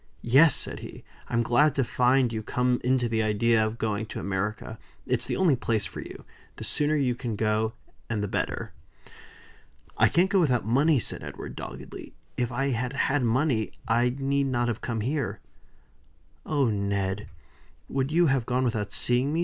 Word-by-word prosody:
"Yes!" 135 +6 +6
said - - -2
he, - - -10 0.2
"I'm 120 0 +1
glad 140 +5 +3
to 135 - +2
find 125 0 +2
you 110 - -2
come 125 +3 0
into 125 -1 +2
the 115 -1 0
idea 110 +1 +2
of 110 +1 -2
going 110 -1 -2
to - - -6
America. 105 +3 -3 0.3
It's 125 -2 -1
the - - -1
only 180 -7 +3
place 115 -4 -1
for 95 - -7
you. - - -9 0.3
The - - -8
sooner 150 +1 0
you 135 -4 +1
can 120 -2 -4
go, 110 +1 0 0.4
and 110 -3 -1
the - - -1
better." - - -3 1.3
"I - - +6
can't 185 +3 +2
go 195 - +4
without 125 - +2
money," 140 +7 +3
said - - -4
Edward, - - -7
doggedly. - - -9 0.2
"If 125 0 -1
I 135 +3 0
had 125 +1 -2
had 140 +1 +1
money, 120 -1 +1
I 120 +2 +2
need 140 0 0
not 120 -2 0
have 115 - -3
come 115 -3 -2
here." 120 -5 -2 1.1
"Oh, 145 -3 +2
Ned! 100 -1 -2 0.6
would 135 +1 -1
you 170 +2 +4
have 135 -5 +1
gone 125 +1 +1
without 110 -4 -1
seeing 125 +3 +2
me?" 160 - 0
120 Hz, 180 wpm, -27 LUFS, 110-135 Hz, 1.3 s, Yes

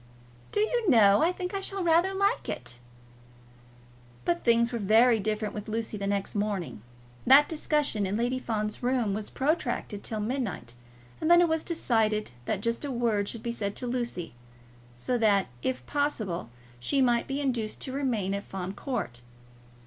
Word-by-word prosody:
"Do 415 - +1
you 445 -1 +1
know, 205 -5 +6
I 340 - +4
think 365 0 -5
I 395 - -1
shall 390 0 -3
rather 340 +3 +4
like 400 +1 0
it." 120 - -5 1.5
But 170 0 0
things 235 0 +3
were 235 - -2
very 225 +3 +5
different 215 0 -2
with 210 0 -6
Lucy 220 0 -3
the 200 -1 -3
next 200 -1 -1
morning. 205 - -2 0.5
That 275 +3 +8
discussion 295 -9 0
in 200 +3 -1
Lady 245 +2 0
Fawn's 215 -3 -3
room 245 -5 +1
was 210 +1 -4
protracted 260 -7 -1
till 220 - -2
midnight, 210 - -3 0.5
and 315 - +1
then 345 0 +8
it 350 - +5
was 320 -1 0
decided 220 - 0
that 200 +6 -1
just 230 +4 -1
a 290 - -3
word 230 -5 0
should 230 - -6
be 235 - -2
said 205 -4 -3
to 250 - -5
Lucy, 240 - -3 0.6
so 245 - -1
that, 200 - +3
if 125 0 -2
possible, 215 - -2 0.3
she 275 - +1
might 240 -3 +3
be 275 +1 -2
induced 240 -6 -2
to 265 - -4
remain 240 -8 -1
at 200 0 -3
Fawn 190 0 -5
Court. 120 - -4
230 Hz, 170 wpm, -28 LUFS, 205-275 Hz, 1.5 s, That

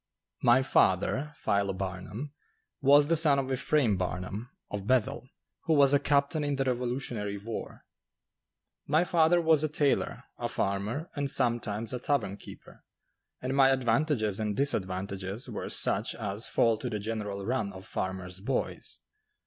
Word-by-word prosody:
My 120 +2 +5
father, 135 +6 +2
Philo 100 -1 0
Barnum, 95 +8 -5 0.5
was 145 +1 +6
the 165 - +3
son 155 -3 +5
of 135 -1 -1
Ephraim 130 -5 +2
Barnum, 90 +5 -4 0.2
of 100 -1 -5
Bethel, 130 +1 +1 0.4
who 160 -1 +3
was 140 -1 +5
a 145 - +5
captain 145 +2 +1
in 145 -1 0
the 135 - 0
revolutionary 120 -5 -2
war. 110 +3 -7 1.0
My 155 +4 +3
father 175 -1 +3
was 160 -2 +3
a 155 - +1
tailor, 145 -2 0 0.2
a - - -2
farmer, 105 - -2
and 140 -1 -1
sometimes 115 -3 -1
a 125 - -2
tavern 120 -7 -1
keeper, - - -13 0.6
and 130 +1 -1
my 135 -1 +6
advantages 125 -4 +1
and 105 -2 -2
disadvantages 95 -4 -1
were - - -5
such 105 +4 0
as 105 0 -2
fall 115 -1 +2
to 125 - -3
the 110 - -2
general 105 -2 -4
run 110 -3 -1
of 95 0 -11
farmers' 95 -1 -4
boys. 120 +7 -3
120 Hz, 150 wpm, -29 LUFS, 100-140 Hz, 1.0 s, was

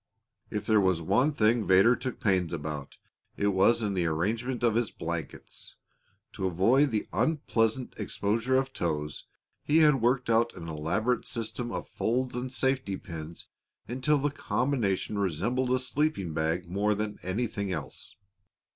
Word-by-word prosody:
If 105 0 -3
there 110 -1 +4
was 95 -3 +2
one 100 - +2
thing 115 -4 +2
Vedder 95 +6 +6
took 130 0 -5
pains 90 -5 +1
about, 75 -3 -5 0.4
it 100 - +2
was 110 +4 +3
in 105 -2 0
the 90 -3 0
arrangement 115 +10 -1
of 115 -2 +4
his 115 -1 +1
blankets. 80 -2 -6 0.6
To 95 - -2
avoid 115 - +3
the 110 -4 -2
unpleasant 125 -6 0
exposure 110 +4 -1
of 135 0 -1
toes 75 -3 -3 0.4
he 150 - +2
had 145 -5 +4
worked 125 +2 +2
out 115 +1 +2
an 85 -3 -8
elaborate 80 +11 -1
system 120 +1 -3
of - - -4
folds 125 +3 -1
and 125 +1 -3
safety 130 -7 0
pins 80 -2 -8 0.4
until 130 +5 +1
the 145 +1 0
combination 110 -8 -1
resembled 100 +8 0
a 130 - +4
sleeping 130 - -1
bag 80 +2 -1
more 100 +4 +1
than 105 0 -4
anything 100 0 -2
else. 80 -5 -6
110 Hz, 150 wpm, -28 LUFS, 90-125 Hz, 0.6 s, Vedder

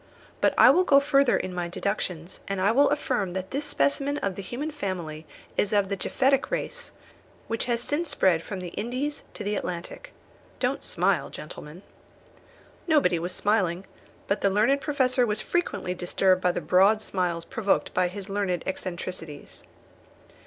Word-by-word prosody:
But - - +3
I - - +9
will 365 - +4
go 280 -6 +6
further 280 -2 +3
in 185 - -4
my 175 -1 -2
deductions, 180 -2 -3
and 195 -1 -2
I 195 +3 +3
will 280 +5 +5
affirm 250 -10 -1
that 190 0 -4
this 280 +2 -2
specimen 285 -1 0
of 200 -7 -1
the 195 - -6
human 255 +10 -4
family 175 - -5 0.3
is 205 - +1
of 205 -2 +2
the 200 - 0
Japhetic 270 +7 +1
race, - - -3 0.6
which 230 0 -2
has 235 -2 0
since 295 +6 -1
spread 185 - +3
from 190 +1 -6
the 180 - -5
Indies 255 - -3
to 210 - -5
the 205 +1 -1
Atlantic. 175 -3 -5 0.5
Don't - - -1
smile, - - +1
gentlemen." 160 +6 -9 1.0
Nobody 295 - +3
was 175 +2 -3
smiling; 195 -4 +1 0.4
but 200 - -1
the 200 - +3
learned 225 +8 +3
Professor 260 -4 +2
was 210 -3 0
frequently 345 - -1
disturbed 185 +1 +2
by 180 - +3
the - - -3
broad 200 +4 +4
smiles 175 -4 -2
provoked 225 -6 0
by 180 0 +2
his 190 +2 -7
learned 195 -4 -1
eccentricities. 175 -5 -6
200 Hz, 165 wpm, -26 LUFS, 180-265 Hz, 1.0 s, I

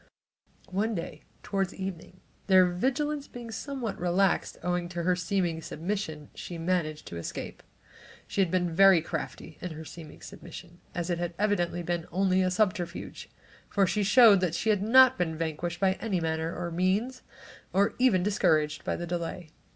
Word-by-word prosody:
One 210 +4 0
day 170 - -6 0.2
toward 195 -2 -1
evening, 185 -1 -7 0.3
their 185 -2 +7
vigilance 275 +11 -1
being 240 -2 -9
somewhat 245 -1 -4
relaxed, 180 +2 +1
owing 175 0 -1
to 175 -1 -4
her 180 +1 +2
seeming 180 -2 -1
submission, 160 -3 -4
she 175 - -7
managed 165 -3 -1
to 85 - -7
escape. 85 - -6 0.6
She 200 - -1
had 185 - +2
been 175 -1 0
very 195 -1 +7
crafty 160 -1 -6
in 180 -3 -5
her 160 +1 -8
"seeming 160 -1 -11
submission" 175 -1 -11 0.2
as 175 0 -2
it 170 - -1
had 175 -1 -3
evidently 175 -4 0
been 170 -1 -2
only 190 +1 +2
a 185 - +2
subterfuge, 185 -2 -2 0.4
for 200 -1 +3
she 210 +3 0
showed 200 -5 +6
she 220 +5 +1
had 205 -2 +1
not 260 +2 +6
been 160 -3 -1
vanquished 165 +1 -3
by 190 -1 +3
any 200 -5 0
manner 160 0 -1
of 170 - -5
means, 200 +9 0 0.5
or 200 +3 +2
even 215 -8 +4
discouraged 155 -7 +1
by - - -1
the 175 - -4
delay. 170 -1 -4
180 Hz, 165 wpm, -28 LUFS, 170-200 Hz, 0.6 s, their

